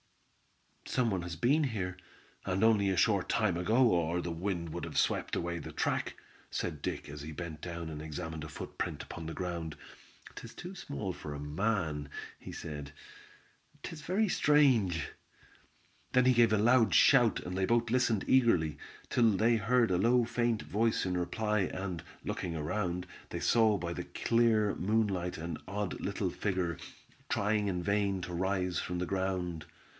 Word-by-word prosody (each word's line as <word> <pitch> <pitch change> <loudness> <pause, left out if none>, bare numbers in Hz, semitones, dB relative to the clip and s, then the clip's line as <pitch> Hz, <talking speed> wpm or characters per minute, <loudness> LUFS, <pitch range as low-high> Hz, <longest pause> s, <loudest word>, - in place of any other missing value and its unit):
"Some 125 -3 +1
one 95 -2 -1
has 85 -1 -5
been 140 - +3
here, 95 -8 -3 0.5
and 95 +3 0
only 105 -3 +4
a 95 - 0
short 100 -2 +2
time 110 -6 +2
ago, 110 +9 +3
or 85 0 +1
the 85 -1 -3
wind 85 0 -2
would - - -5
have - - -5
swept - - +1
away 85 0 -2
the - - -7
track," - - -1 0.3
said - - -3
Dick, - - -3
as 75 0 -8
he 75 +2 -6
bent 80 -1 -6
down 85 -1 -5
and 75 -1 -6
examined 80 0 -5
a 80 - -7
footprint - - -5
upon 80 - -7
the 80 - -5
ground. 85 -4 -4 0.6
"'Tis 115 - -9
too 180 +2 -7
small 110 - -4
for 75 -3 -7
a - - -6
man," 75 -1 -1 0.3
he - - -9
said. 75 -3 -6 0.9
"'Tis 160 -2 -7
very 200 +7 +1
strange." 130 - +3 1.0
Then 125 0 +5
he 130 - +6
gave 120 -2 +5
a 110 - +4
loud 115 +2 +4
shout, 125 -5 +6
and 90 0 -5
they 95 0 +1
both 115 -1 +2
listened 120 -5 +2
eagerly, 95 - +3 0.3
till 115 -2 +4
they 115 +3 +4
heard 115 0 +2
a 90 - +3
low 120 +3 +4
faint 120 -1 0
voice 110 +1 +1
in 90 -1 -1
reply, 105 +5 0
and, 95 -3 -3 0.2
looking 85 -2 -3
around, 90 +3 -2 0.2
they - - -4
saw 110 -3 +4
by 85 -2 -3
the - - -4
clear 115 -3 +2
moonlight 100 -3 0
an 80 -1 -5
odd 100 0 -3
little - - -1
figure 95 -4 -1 0.5
trying 105 0 +1
in 90 -2 -1
vain 100 0 +1
to 90 - -5
rise 90 0 0
from 90 - -3
the 90 - -1
ground. 90 -4 -2
95 Hz, 170 wpm, -32 LUFS, 85-115 Hz, 1.0 s, he